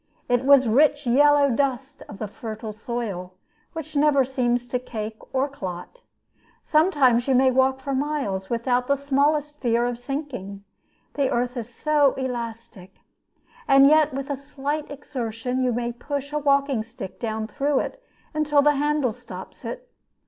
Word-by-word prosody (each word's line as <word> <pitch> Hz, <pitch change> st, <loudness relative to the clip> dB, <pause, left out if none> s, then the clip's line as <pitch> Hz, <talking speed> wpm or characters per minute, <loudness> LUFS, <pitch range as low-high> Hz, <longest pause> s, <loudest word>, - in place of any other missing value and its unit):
It 245 Hz, +1 st, +1 dB
was 275 Hz, -2 st, +6 dB
rich 290 Hz, +5 st, +3 dB
yellow 285 Hz, +3 st, +5 dB
dust 270 Hz, +2 st, -1 dB
of 205 Hz, -, -9 dB
the 215 Hz, -, -4 dB
fertile 220 Hz, +1 st, -7 dB
soil, 210 Hz, -5 st, -5 dB, 0.4 s
which 310 Hz, -1 st, -7 dB
never 285 Hz, -2 st, +4 dB
seems 245 Hz, -2 st, 0 dB
to 250 Hz, +1 st, -2 dB
cake 220 Hz, -3 st, -6 dB
or 265 Hz, +1 st, +1 dB
clot. 195 Hz, -, -8 dB, 0.6 s
Sometimes 285 Hz, -7 st, +3 dB
you 265 Hz, -, +3 dB
may 260 Hz, +1 st, +5 dB
walk 265 Hz, +1 st, +2 dB
for 275 Hz, +1 st, -3 dB
miles 265 Hz, -9 st, -2 dB
without 245 Hz, +1 st, 0 dB
the 280 Hz, -, +3 dB
smallest 290 Hz, +2 st, 0 dB
fear 235 Hz, -1 st, +2 dB
of 245 Hz, -1 st, -3 dB
sinking, 245 Hz, -8 st, -5 dB, 0.5 s
the 275 Hz, -2 st, +1 dB
earth 245 Hz, +1 st, -1 dB
is 240 Hz, -1 st, -6 dB
so 290 Hz, +1 st, +2 dB
elastic. 230 Hz, -6 st, -6 dB, 0.7 s
And 275 Hz, 0 st, +7 dB
yet 305 Hz, +1 st, +5 dB
with 275 Hz, +1 st, -4 dB
a -, -, 0 dB
slight 285 Hz, +2 st, -4 dB
exertion 250 Hz, -3 st, -4 dB
you 255 Hz, -1 st, +1 dB
may 240 Hz, 0 st, -2 dB
push 280 Hz, +4 st, -5 dB
a 300 Hz, -, +1 dB
walking 280 Hz, -4 st, +2 dB
stick 215 Hz, -4 st, -9 dB
down 220 Hz, -2 st, -2 dB
through 275 Hz, +6 st, 0 dB
it -, -, -6 dB, 0.3 s
until 300 Hz, -2 st, +2 dB
the 295 Hz, -1 st, +4 dB
handle 295 Hz, -4 st, +1 dB
stops 245 Hz, +2 st, -11 dB
it. -, -, -6 dB
260 Hz, 155 wpm, -24 LUFS, 235-285 Hz, 0.7 s, And